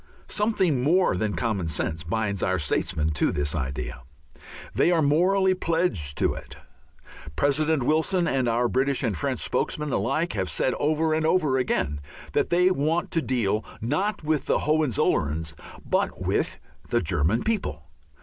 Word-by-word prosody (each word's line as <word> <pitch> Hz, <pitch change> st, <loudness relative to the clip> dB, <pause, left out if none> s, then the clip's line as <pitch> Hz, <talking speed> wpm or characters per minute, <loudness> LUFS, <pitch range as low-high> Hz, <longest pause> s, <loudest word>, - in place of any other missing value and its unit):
Something 195 Hz, -, +1 dB
more 170 Hz, -, +3 dB
than 105 Hz, +2 st, -1 dB
common 105 Hz, -8 st, -1 dB
sense 80 Hz, +1 st, -2 dB
binds 100 Hz, +3 st, -2 dB
our 95 Hz, 0 st, +1 dB
statesmen 80 Hz, 0 st, 0 dB
to 75 Hz, -, +1 dB
this 75 Hz, 0 st, -1 dB
idea. 65 Hz, -4 st, -4 dB, 0.7 s
They -, -, +3 dB
are 170 Hz, -3 st, +3 dB
morally 185 Hz, +6 st, +3 dB
pledged 165 Hz, -, -1 dB
to -, -, +2 dB
it. -, -, -9 dB, 0.8 s
President 145 Hz, 0 st, +1 dB
Wilson 160 Hz, +5 st, +2 dB
and 130 Hz, -1 st, +1 dB
our 120 Hz, +1 st, +2 dB
British 135 Hz, +3 st, +1 dB
and 110 Hz, -6 st, 0 dB
French 80 Hz, -, -2 dB
spokesmen 150 Hz, -1 st, -1 dB
alike 155 Hz, -, 0 dB
have 95 Hz, -3 st, -2 dB
said 130 Hz, -, 0 dB
over 155 Hz, +1 st, +1 dB
and 160 Hz, 0 st, 0 dB
over 155 Hz, -5 st, +2 dB
again 75 Hz, -, -1 dB, 0.3 s
that -, -, +1 dB
they 180 Hz, +2 st, +4 dB
want 165 Hz, +1 st, 0 dB
to 165 Hz, -, +1 dB
deal 110 Hz, -6 st, 0 dB, 0.2 s
not 160 Hz, -, -1 dB
with 155 Hz, -1 st, 0 dB
the -, -, +3 dB
Hohenzollerns 105 Hz, -, +1 dB, 0.3 s
but -, -, 0 dB
with -, -, -1 dB, 0.3 s
the -, -, +1 dB
German 85 Hz, +11 st, +1 dB
people. 210 Hz, -, -2 dB
130 Hz, 150 wpm, -25 LUFS, -, 0.8 s, they